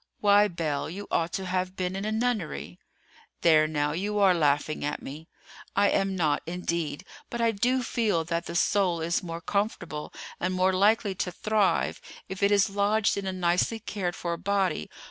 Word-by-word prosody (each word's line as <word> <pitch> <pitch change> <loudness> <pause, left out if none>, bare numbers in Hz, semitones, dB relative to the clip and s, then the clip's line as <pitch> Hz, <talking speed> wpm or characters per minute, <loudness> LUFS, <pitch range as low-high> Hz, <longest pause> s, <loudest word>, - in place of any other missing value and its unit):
"Why, 205 0 +5
Belle, 160 -6 -2
you 200 +5 -7
ought 165 +1 +1
to 190 - -3
have 185 0 -2
been 185 0 -2
in 195 +1 -3
a 215 - -1
nunnery." 220 - -2 0.6
"There, 155 -2 +5
now, 150 -1 0
you 200 +6 -2
are 195 -2 +5
laughing 150 -2 +1
at 150 - -2
me." 150 +4 -9 0.5
"I 200 0 +4
am 195 -1 +1
not, 155 -5 +1
indeed; 170 -2 -3 0.2
but 235 - -5
I 230 -1 +3
do 250 +5 +1
feel 215 -9 0
that 170 +1 -3
the - - -6
soul 185 -2 +2
is 165 +1 0
more 170 -1 -6
comfortable, 175 -7 -2 0.3
and 185 +1 -1
more 185 +1 +3
likely 205 +2 +3
to 180 -1 -3
thrive, 215 +1 +1 0.3
if 190 +1 -7
it 200 - +4
is 200 0 +4
lodged 205 +1 +1
in 200 -1 -3
a - - 0
nicely 180 +4 +1
cared 190 -5 -4
for 170 -1 -3
body. 195 - 0
185 Hz, 185 wpm, -27 LUFS, 170-205 Hz, 0.6 s, Why